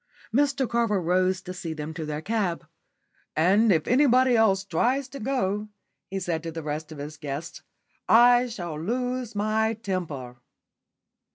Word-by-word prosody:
Mr 275 0 +2
Carver 230 -4 +1
rose 185 +1 +1
to 180 - -6
see 175 -3 -5
them 155 0 -6
to 160 -2 -5
their 150 +1 -4
cab. 200 -5 -1 0.7
"And 200 +7 +4
if 160 -4 +2
anybody 255 -1 +4
else 200 -4 +3
tries 245 +9 0
to 275 - -8
go," 210 -4 -1 0.4
he 195 0 -3
said 175 -3 -2
to 165 0 -5
the 165 0 -6
rest 150 +1 -4
of 155 - -8
his 145 +2 -7
guests, 145 +2 -6 0.5
"I 245 +2 +6
shall 175 -9 -6
lose 245 +3 -2
my 220 +2 +1
temper." 165 - -5
195 Hz, 155 wpm, -26 LUFS, 160-235 Hz, 0.7 s, I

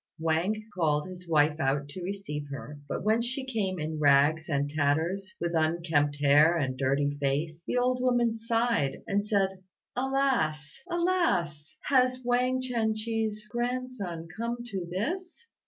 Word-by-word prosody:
Wang 170 +7 0
called 150 -3 +1
his 180 -1 -10
wife 150 -1 +3
out 140 +1 0
to 185 - -7
receive 175 -6 -4
her; 145 +1 -7
but - - -3
when 220 +3 +3
she 260 +3 -2
came 210 -7 -1
in 155 -1 -3
rags 145 +3 +4
and 140 -1 +1
tatters, 160 +6 0
with 170 0 -2
unkempt 160 -2 +1
hair 145 +4 +5
and 130 -5 -1
dirty 140 +2 +1
face, 155 +4 -1
the - - 0
old 250 0 +2
woman 240 -2 +2
sighed, 230 - 0
and 200 +1 0
said, 195 -2 0 0.4
"Alas! 250 - 0
Alas! 335 - 0
has 255 -2 +3
Wang 250 +1 +2
Chien 230 -4 0
chih's 215 -1 -2
grandson 240 -8 -3
come 235 +1 -3
to 195 -7 -4
this?" 355 - -4
185 Hz, 145 wpm, -29 LUFS, 150-240 Hz, 0.4 s, hair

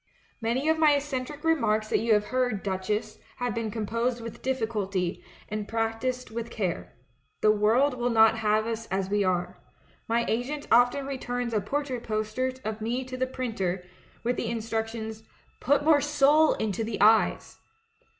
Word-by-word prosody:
*"^Ianv 260 +7 +1
of 320 - 0
my 305 -2 +6
eccentric 285 0 -4
remarks 220 -10 +1
that - - +2
you 225 -1 +3
have 210 0 +1
heard. 250 -6 0
Duchess, 210 +3 -2 0.2
have 245 -2 -2
been 230 0 -2
composed 230 +3 -1
with 230 -1 -8
diffi 260 -3 0
culty, 195 -5 -2 0.3
and 210 -1 -4
practised 225 +2 -2
with 230 +1 -4
care. 190 -7 -3 0.5
The 215 - +5
world 225 +7 +3
will 245 0 -1
not 225 -1 +5
have 215 0 +2
us 225 0 -4
as 190 +1 -2
we 205 0 +2
are. 180 -2 -1 0.5
^Iv 235 +1 +1
assent 285 +3 -6
often 245 +4 +4
returns 245 -3 -3
a 210 - +1
portrait 260 +3 -2
poster 215 +4 -1
of 220 0 -4
me 240 +4 -1
to 255 0 -6
the 255 0 -1
printer, 195 -9 -3 0.4
with 245 +1 0
the - - -2
in 235 - -1
structions, 220 0 -4 0.4
'Put 285 +2 +2
more 300 -1 +5
soul 295 +2 +4
into 220 +1 -2
the 220 -1 -4
eyes'! 220 +1 +3
230 Hz, 170 wpm, -27 LUFS, 215-255 Hz, 0.5 s, my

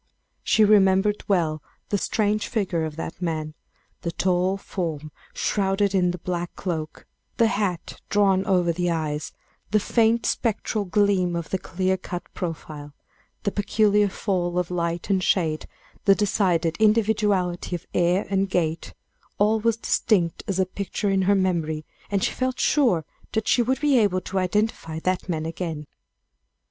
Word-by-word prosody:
She 220 - +4
remembered 205 0 +4
well 160 -6 +1 0.3
the 205 - +1
strange 210 +1 0
figure 185 -8 -1
of 155 -1 -6
that 165 +2 -6
man 155 -3 -2 0.5
the 170 - -3
tall 185 +2 +1
form 160 -6 -4 0.2
shrouded 200 0 0
in 180 -2 +3
the 180 - -3
black 175 0 -4
cloak 160 -4 -4 0.3
the 230 - +5
hat 205 -7 -2
drawn 195 -2 +3
over 180 -3 +3
the 175 +1 -1
eyes 155 -3 -2 0.4
the 215 +2 +3
faint 230 +2 +2
spectral 215 -2 -1
gleam 190 -2 +2
of 170 -2 -4
the 190 - 0
clear 185 +2 -1
cut 175 -1 -6
profile 150 -4 -6 0.5
the 200 - 0
peculiar 205 0 +2
fall 180 -3 -1
of 180 0 -1
light 170 +1 -2
and 190 -1 +2
shade, 160 -5 +1 0.4
the 195 - +6
decided 180 -5 +1
individuality 210 -5 +2
of 170 - -7
air 180 +2 +2
and 195 0 +1
gait 165 -3 -1 0.4
all 215 +2 +3
was 230 0 +1
distinct 180 -7 +1
as 195 -2 -1
a 190 - +3
picture 200 +2 -3
in 195 0 +2
her 200 +2 +3
memory, 165 -5 0 0.2
and 200 -2 0
she - - +1
felt 255 0 -2
sure 230 - +2 0.3
that 220 -1 -1
she 245 - +4
would 260 +3 0
be 290 -4 +4
able 190 -4 +2
to 190 +2 -2
identify 185 -4 -1
that 185 +3 -2
man 160 -2 -1
again. 165 -2 -4
185 Hz, 155 wpm, -24 LUFS, 170-205 Hz, 0.5 s, the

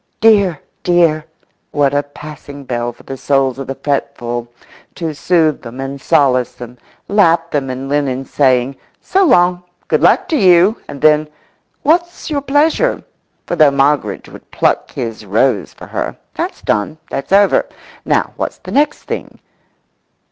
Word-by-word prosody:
"Dear, 200 -8 +4 0.2
dear!" 170 -3 +2 0.4
what 145 -1 +1
a 145 - +2
passing 145 0 -11
bell 120 -2 -2
for 120 - -19
the 135 - -7
souls 135 -1 +1
of 135 - -6
the 135 - -4
fretful 120 -4 -3 0.5
to 165 -3 -3
soothe 160 0 +1
them 120 +2 -9
and 135 +1 -5
solace 135 -6 +2
them, 120 0 -11 0.3
lap 170 -5 +3
them 140 -3 -1
in 130 +1 -5
linen, 135 -2 -1
saying, 130 -1 +1 0.2
"So 390 +1 +1
long. 180 - +4 0.3
Good - - +1
luck - - +4
to 315 - +1
you!" 185 +1 +4
and 140 - -9
then, 155 0 +4 0.6
"What's 345 +2 0
your 285 -2 0
pleasure?" 300 - +1 0.4
for - - -2
though 155 -3 +6
Moggridge 140 -6 0
would - - -14
pluck - - 0
his 115 -2 -5
rose 105 +1 +1
for - - -12
her, - - -4 0.2
that's - - -4
done, 105 +10 -1
that's 135 - -4
over. 200 0 +4 0.4
Now - - 0
what's - - -3
the - - -10
next 295 +1 +1
thing? - - -6
145 Hz, 155 wpm, -16 LUFS, 135-175 Hz, 0.6 s, though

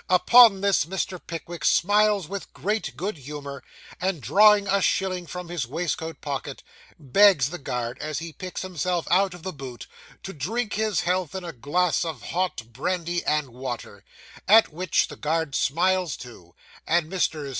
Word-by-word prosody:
Upon 205 +2 +7
this, 200 -6 +2
Mr. 185 0 -4
Pickwick 170 +1 -7
smiles 205 -1 +3
with 200 +1 -7
great 210 +2 -3
good 195 0 -3
humour, 140 0 -8 0.4
and 185 -2 -1
drawing 200 - +5
a 200 0 +2
shilling 185 -2 0
from 180 0 -7
his 170 -8 -3
waistcoat 160 +2 -4
pocket, 140 -1 -5 0.3
begs 150 -1 +4
the 175 - -6
guard, 125 -2 -4
as 155 -1 -4
he 165 0 -6
picks 185 +1 -6
himself 180 -1 -2
out 190 0 +3
of 175 - -14
the 190 0 -4
boot, 130 -4 -9 0.4
to 195 - -7
drink 210 - -3
his 215 -3 0
health 180 0 -1
in 190 - -4
a 170 - -6
glass 165 +9 0
of 155 -10 -5
hot 170 -11 -3
brandy 175 +5 -2
and 150 -3 0
water; 120 -4 -7 0.4
at 215 -4 +6
which 180 +1 +1
the - - -10
guard 160 -1 -1
smiles 180 +4 +1
too, 90 -9 -13 0.3
and 170 -1 +2
Messrs. 160 -5 -1
175 Hz, 165 wpm, -25 LUFS, 145-190 Hz, 0.4 s, Upon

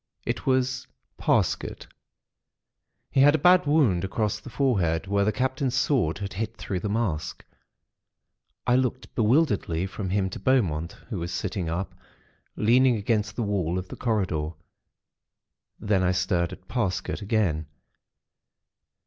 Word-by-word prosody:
It - - -3
was 130 0 +1 0.3
Parsket. - - 0 1.3
He - - +1
had 145 +2 +7
a - - +3
bad 180 -1 +5
wound 135 - +3
across 105 +2 -1
the - - -10
forehead, 95 - +1
where 100 +1 +1
the 105 - +2
Captain's 130 +3 -1
sword 130 - +1
had 100 -1 -5
hit 110 +3 -4
through 95 - -3
the 105 - -3
mask. 100 -8 -2 1.2
I 125 0 +4
looked 130 0 -2
bewilderedly 105 - +2
from 95 0 -5
him 95 0 +1
to - - -6
Beaumont, 90 -10 +1 0.2
who 100 - -2
was 85 +1 -4
sitting 90 -6 -3
up, 90 +4 -3 0.6
leaning 125 +3 +4
against 105 0 -1
the 120 - -1
wall 95 -4 -1
of 90 +1 -5
the - - -7
corridor. 95 -10 -1 1.3
Then 100 -2 +1
I 90 0 +2
stared 90 -2 0
at 90 - -11
Parsket, 100 -4 -2
again. 100 -7 0
105 Hz, 140 wpm, -26 LUFS, 90-125 Hz, 1.3 s, had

